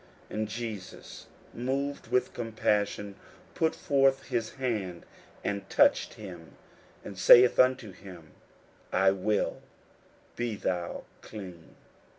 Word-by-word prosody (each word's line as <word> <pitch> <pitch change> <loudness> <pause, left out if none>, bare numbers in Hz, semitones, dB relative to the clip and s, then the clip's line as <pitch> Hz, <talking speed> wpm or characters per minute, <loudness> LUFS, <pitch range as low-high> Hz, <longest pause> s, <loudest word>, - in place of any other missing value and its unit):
41:001:041 - - -5
And 110 - -1
Jesus, 110 -4 -7 0.3
moved 135 +2 -3
with 125 +2 0
compassion, 105 -3 -1 0.4
put 160 -1 +1
forth 135 -1 +2
his 115 -3 -2
hand, 105 -10 -3 0.4
and 100 -1 -3
touched - - +3
him, 90 -6 -10 0.5
and 100 -2 -8
saith 120 +5 +7
unto 130 -4 +3
him, 90 -4 -13 0.6
I 95 +1 +4
will; 100 +2 -1 0.7
be 120 -2 -2
thou 90 -3 -3 0.2
clean. 90 -6 -10
110 Hz, 110 wpm, -29 LUFS, 95-125 Hz, 0.7 s, saith